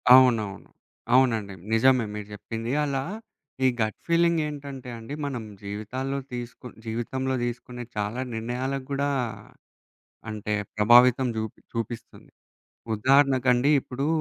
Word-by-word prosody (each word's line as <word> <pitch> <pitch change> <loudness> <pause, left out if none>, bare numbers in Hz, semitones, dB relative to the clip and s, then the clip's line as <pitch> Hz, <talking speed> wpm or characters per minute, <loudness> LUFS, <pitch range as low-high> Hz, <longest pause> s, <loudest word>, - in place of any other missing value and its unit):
అవునవును. 115 -7 +3 0.4
అవునండి. 115 -6 +3 0.2
నిజమే 125 +1 +5
మీరు 105 -1 -6
జెప్పింది. 115 +3 -5
అలా 135 -2 -1 0.6
ఈ - - +7
గట్ 110 -1 0
ఫీలింగ్ 170 0 +3
ఏంటంటే 140 -3 -7
అండి 115 +5 -8
మనం 130 -5 -3 0.2
జీవితాల్లో 115 +7 -3 0.2
తీసుకున్ 125 0 -7
జీవితంలో 130 +4 -2
తీసుకునే 120 0 -5
చాలా 105 +4 -1
నిర్ణయాల 120 +4 -2
గూడా 140 0 0 1.2
అంటే, 105 0 -3 0.2
ప్రభావితం 120 +4 +6
జూప్ 110 -1 -4 0.2
చూపిస్తుంది. 115 0 -6 0.6
ఉదాహరణకండి 130 +2 +4
ఇప్పుడు 135 +2 -3
125 Hz, 105 wpm, -26 LUFS, 110-130 Hz, 1.2 s, ఈ